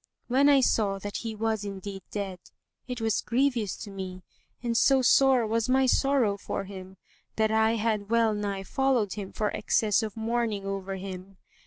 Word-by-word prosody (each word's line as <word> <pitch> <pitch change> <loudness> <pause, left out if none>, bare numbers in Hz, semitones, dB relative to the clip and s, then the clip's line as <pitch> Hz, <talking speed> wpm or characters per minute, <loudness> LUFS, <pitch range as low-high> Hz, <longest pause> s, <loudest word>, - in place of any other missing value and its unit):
When 270 +4 +4
I 280 -2 +6
saw 205 -5 +2
that 205 +1 -5
he 225 -1 -5
was 220 -1 -1
indeed 195 -1 -6
dead, 195 -3 -4 0.5
it 250 -2 -5
was 225 -2 +1
grievous 240 -5 0
to 205 - -8
me 185 -2 -7 0.4
and 235 -1 -1
so 265 +2 +4
sore 260 -1 +5
was 225 +2 0
my 265 +1 +4
sorrow 255 -6 +2
for 195 - -4
him 190 -1 -10 0.4
that 220 0 +1
I 220 0 +3
had 215 -2 -1
well 230 -1 +3
nigh 200 -2 -3
followed 250 -4 +1
him 200 -2 -6
for 210 -1 -2
excess 215 0 +2
of 220 -1 -5
mourning 225 -3 -1
over 195 -1 -4
him. 190 0 -8
215 Hz, 175 wpm, -27 LUFS, 195-235 Hz, 0.5 s, I